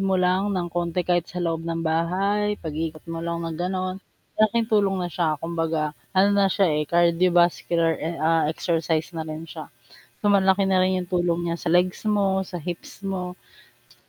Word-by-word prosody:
mo 195 -1 +1
lang 185 +2 +2
ng 175 -2 -1
konti, 175 0 -1
kahit 175 -1 +1
sa 180 0 -4
loob 165 -1 -1
ng 165 0 -2
bahay, 195 +6 +1
pag-ikot 155 0 -4
mo 165 - -4
lang 170 0 -3
na 165 - -3
gano'n, 185 +3 -3 0.4
malaking 220 +1 +3
tulong 200 -2 +3
na 175 - -2
siya. 160 -3 0
Kumbaga, 165 -1 -2 0.2
ano 195 +2 +6
na 200 -1 +4
siya, 195 +1 +2
eh, 150 -1 -1
cardiovascular, 170 -1 +3
eh, 165 +2 -3
ah, 160 0 +2
exercise 165 0 -1
na 165 - -4
rin 155 +1 -6
siya, 160 -1 -9 0.5
so, 205 - +1
malaki 195 -1 +4
na 190 -1 +3
rin 185 0 +1
'yung 180 - -7
tulong 175 -1 0
niya 170 - -1
sa 170 - -1
legs 180 +3 +2
mo, 195 -2 +1
sa 175 -1 -7
hips 175 +4 -7
mo, 180 -2 -3 0.7
sa - - -39
175 Hz, 190 wpm, -24 LUFS, 165-190 Hz, 0.7 s, ano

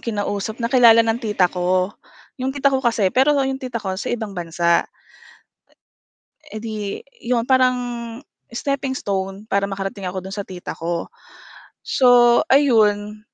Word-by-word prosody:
kinausap 205 -1 -3
na 230 - -1
kilala 230 -3 +7
ng 225 +1 0
tita 210 -5 +1
ko. 185 +1 0 0.5
'Yong 265 +1 -2
tita 275 -1 +2
ko 265 - +1
kasi 225 -6 +1
pero 280 +3 +3
'yong 270 -1 -1
tita 245 -4 -5
ko 190 - -3
sa - - -4
ibang 220 -4 -3
bansa 170 -1 0 1.7
e 215 - -5
edi 220 -1 -5 0.5
'yon 235 -1 0
parang 255 -1 +4 0.8
steppingstone 220 -7 -3
para 200 -1 +1
makarating 195 0 -5
ako 185 +1 -3
do'n 190 +1 -8
sa 200 - -4
tita 180 -2 -8
ko, 170 +1 -3 0.8
so 245 -2 +5
ayun, 215 -6 +3
220 Hz, 140 wpm, -21 LUFS, 195-255 Hz, 1.7 s, kilala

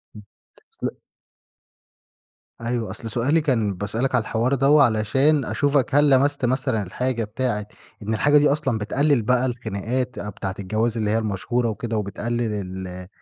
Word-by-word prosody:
امم، 105 - -10 0.6
أصل - - -2 1.6
أيوه، 115 -2 -2
أصل 115 +4 -6
سؤالي 140 +8 +2
كان 115 -9 +1
باسألك 110 +8 -1
على 125 - +3
الحوار 115 +4 0
دوّة، 140 +2 +5
علشان 130 +6 +2
أشوفك 140 -2 +1
هل 145 0 +5
لمَسْت 140 0 +3
مثلًا 130 -4 0
الحاجة 120 +5 -2
بتاعة 105 -1 -2 0.4
إن 110 +2 -2
الحاجة 145 +7 +4
دي 145 0 +4
أصلًا 140 -5 0
بتقلّل 140 +5 +1
بقى 125 +3 +2
الخناقات 120 +1 -3
أ 105 - -5
بتاعة 95 -1 -5
الجواز، 110 +4 -1
اللي 105 -1 0
هي 110 - +2
المشهورة 115 +3 -1
وكده 110 +1 -3
وبتقلّل 115 +3 -2
ال 95 -2 -5
أ 90 0 -8
120 Hz, 155 wpm, -23 LUFS, 105-130 Hz, 1.6 s, دوّة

